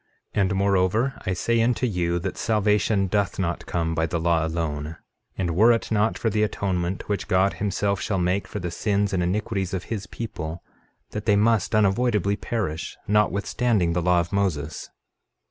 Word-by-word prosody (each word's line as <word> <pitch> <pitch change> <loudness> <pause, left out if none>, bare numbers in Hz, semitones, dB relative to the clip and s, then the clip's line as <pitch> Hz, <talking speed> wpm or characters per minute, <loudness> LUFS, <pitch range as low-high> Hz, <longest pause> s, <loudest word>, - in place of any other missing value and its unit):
13:28 105 - +2
And 95 0 +1
moreover, 100 +6 +1
I 95 - +1
say 115 +5 +1
unto 125 +2 +1
you, 90 -6 0
that 85 - -3
salvation 105 -1 +2
doth 100 +1 0
not 85 -3 -2
come 80 -1 -1
by 80 0 0
the 85 - -2
law 85 -1 +2
alone; 80 -1 -3 0.4
and 85 -3 -1
were 110 +6 +6
it 115 -1 0
not 110 +1 +2
for 115 - 0
the 105 - +1
atonement, 95 -4 -1
which 105 -1 -2
God 95 +1 +3
himself 100 0 0
shall 100 - -1
make 90 +2 0
for - - -6
the 90 -3 -3
sins 100 +2 0
and 90 - +1
iniquities 95 +1 -1
of 90 - -4
his 105 -2 -5
people, 85 -8 -6 0.5
that 105 +1 -5
they 105 - +5
must 110 0 +2
unavoidably 105 -1 +2
perish, 100 -7 -3
notwithstanding 105 -2 +1
the 90 - 0
law 90 0 +3
of 85 0 -2
Moses. 80 -7 -1
100 Hz, 180 wpm, -24 LUFS, 85-105 Hz, 0.5 s, were